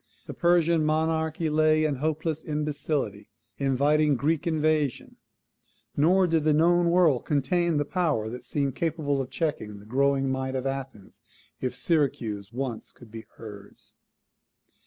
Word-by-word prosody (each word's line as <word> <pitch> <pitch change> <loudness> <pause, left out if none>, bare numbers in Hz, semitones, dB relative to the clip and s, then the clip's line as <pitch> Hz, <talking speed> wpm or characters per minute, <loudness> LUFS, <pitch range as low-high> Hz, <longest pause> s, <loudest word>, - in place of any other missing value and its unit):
The - - -7
Persian 170 -2 +3
monarchy 160 +1 0
lay 155 0 +3
in 145 -3 -1
hopeless 155 +2 -2
imbecility, 150 -8 -3 0.3
inviting 145 +2 +2
Greek 155 +5 0
invasion; 155 -4 0 0.8
nor 180 +6 +4
did 165 -3 +1
the 155 -1 +3
known 170 +2 +3
world 170 -7 +3
contain 170 +3 +1
the 145 - 0
power 150 - 0
that 125 +2 -7
seemed 140 +2 -1
capable 150 -4 -1
of 130 - -6
checking 125 -11 -3
the 100 - -14
growing 135 +3 +1
might 130 0 -2
of 130 0 -3
Athens, 135 -7 -6 0.4
if 130 -1 -3
Syracuse 115 - -1
once 125 -2 -5
could 120 -4 -17
be 110 -1 -9
hers. 105 -3 -11
150 Hz, 135 wpm, -26 LUFS, 130-160 Hz, 0.8 s, nor